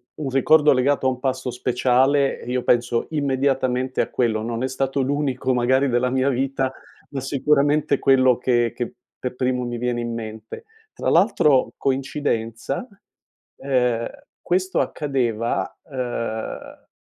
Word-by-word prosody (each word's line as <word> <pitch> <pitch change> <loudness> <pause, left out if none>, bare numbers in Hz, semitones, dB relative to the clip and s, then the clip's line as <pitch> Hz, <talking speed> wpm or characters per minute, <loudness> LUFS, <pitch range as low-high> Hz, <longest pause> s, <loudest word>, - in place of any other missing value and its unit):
u 155 - -6
un 135 - -2
ricordo 150 +3 +4
legato 135 +1 +2
a - - +5
un 125 -1 -4
passo 130 -1 -2
speciale, 130 +3 +2
eh, 120 - -9
io 125 0 -1
penso 120 -1 +1
immediatamente 130 -3 0
a - - +1
quello. 115 -3 0
Non 115 +1 -3
è 130 - -1
stato 135 +1 -1
l'unico 135 -1 0
magari 130 +3 +2
della 125 +1 +1
mia 130 +1 +1
vita, 135 0 -1 0.4
ma 140 - -4
sicuramente 145 +2 +2
è - - -7
quello 130 -2 +4
che 120 -2 +1
che 120 - -4 0.3
per 125 - -3
primo 125 -1 -1
mi 120 0 -4
viene 120 0 -1
in 120 0 -3
mente. 110 - -7 0.3
Tra - - -2
l'altro, 160 - +3
coincidenza, 135 - -2 0.7
ehm, 125 -4 0 0.3
questo 185 +1 0
accadeva, 120 -6 -1
ehm, 120 -3 -5
130 Hz, 145 wpm, -22 LUFS, 120-135 Hz, 0.7 s, a